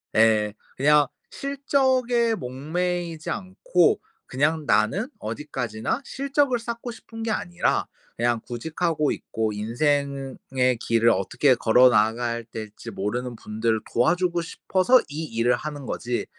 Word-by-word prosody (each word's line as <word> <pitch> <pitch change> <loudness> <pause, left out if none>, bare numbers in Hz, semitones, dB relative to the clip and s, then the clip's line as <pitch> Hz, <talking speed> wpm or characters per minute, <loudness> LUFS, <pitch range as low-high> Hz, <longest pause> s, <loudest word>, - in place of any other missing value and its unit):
예. 110 -2 +4 0.2
그냥 145 +1 +4 0.2
실적에 260 -4 +1
목매이지 165 +4 -3
않고 415 - +1 0.2
그냥 155 +3 0
나는 145 - +2
어디까지나 115 - -3
실적을 275 -2 0
쌓고 235 +1 -5
싶은 225 0 -9
게 225 - -1
아니라 175 -4 0 0.3
그냥 120 -1 +1
구직하고 155 +5 -1
있고 110 -1 -2
인생의 135 +5 -1 0.2
의 125 -2 +2
길을 115 0 +2
어떻게 120 +6 +3
걸어 125 +3 +5
나가야 115 +1 +1
될지 110 +1 -7
모르는 120 +5 -3
분들을 110 +1 -1
도와주고 175 +7 +2
싶어서 190 +8 +3
이 150 +3 -5
일을 120 -2 +1
하는 145 -1 -6
거지, 120 0 -2
140 Hz, 280 characters per minute, -24 LUFS, 115-185 Hz, 0.3 s, 걸어